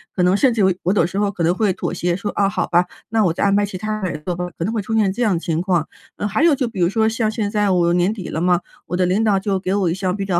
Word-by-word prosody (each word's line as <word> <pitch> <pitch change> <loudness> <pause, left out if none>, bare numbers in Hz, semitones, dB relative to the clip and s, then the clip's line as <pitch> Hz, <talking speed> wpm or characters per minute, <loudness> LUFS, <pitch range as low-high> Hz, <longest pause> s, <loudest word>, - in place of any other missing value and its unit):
可 180 - +1
能 180 +2 +4
甚 255 +2 +3
至 225 - 0
有 190 -1 +4
我 185 - +2
有 205 - +3
时 190 +3 -3
候 205 -1 +1
可 175 - -3
能 170 +2 +3
会 200 0 +1
妥 - - -4
协 175 -1 -1
说： 205 +2 -4
“啊， 200 - +1
好 195 -1 -1
吧， 175 +1 +3 0.2
那 220 -1 +2
我 170 - +2
再 - - -2
安 200 - +3
排 205 0 +3
其 195 -2 -6
他 215 +2 -3
人 175 -5 -3
做 180 - -1
吧。” 180 0 -3
可 - - -3
能 220 - -2
会 220 - -1
出 225 +3 -3
现 210 -3 +3
这 235 - -5
样 205 -6 +2
情 165 -1 -2
况。 175 -4 0 0.3
呃， - - -4
还 210 +9 0
有 330 -3 +5
就 255 -2 -1
比 210 - -7
如 175 - +4
说 220 +2 +2
像 225 -1 0
现 210 -1 -2
在 210 -1 +1
我 175 -2 +2
年 180 +4 +2
底 195 -6 -7
了 160 - -3
嘛， 175 +1 +2 0.3
我 175 - -3
的 180 - +2
领 190 +5 +1
导 205 -3 +3
就 195 0 -1
给 185 0 -2
我 195 -4 +1
一 - - 0
项 185 0 -2
比 200 - -3
较 180 -3 +1
195 Hz, 365 characters per minute, -20 LUFS, 180-210 Hz, 0.3 s, 有